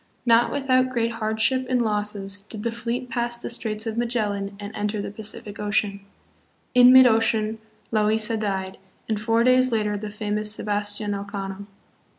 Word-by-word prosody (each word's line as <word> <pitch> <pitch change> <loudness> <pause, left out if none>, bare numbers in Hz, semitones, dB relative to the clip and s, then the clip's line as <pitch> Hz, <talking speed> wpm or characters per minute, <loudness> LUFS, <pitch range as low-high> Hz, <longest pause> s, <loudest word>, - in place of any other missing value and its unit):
Not 235 0 +4
without 255 -2 +2
great 235 -2 0
hardship 225 +3 0
and 255 -1 +2
losses 210 -3 -2
did 210 +1 -9
the 235 - -1
fleet 235 +2 -4
pass 240 0 -1
the 235 - -5
Straits 220 -2 -2
of 225 0 -2
Magellan 205 -4 -2
and 205 +1 -7
enter 210 0 -2
the 200 - -4
Pacific 210 -1 -5
Ocean. 205 -1 0 0.7
In 250 0 +8
mid 260 0 +9
ocean 220 -1 +2 0.3
Loaisa 215 +1 +2
died, 195 -3 -3 0.3
and 215 -1 -1
four 225 +1 +2
days 255 +1 +4
later 210 -2 0
the 210 0 -5
famous 210 0 -2
Sebastian 205 0 -2
Elcano. 200 0 -6
215 Hz, 160 wpm, -24 LUFS, 205-235 Hz, 0.7 s, mid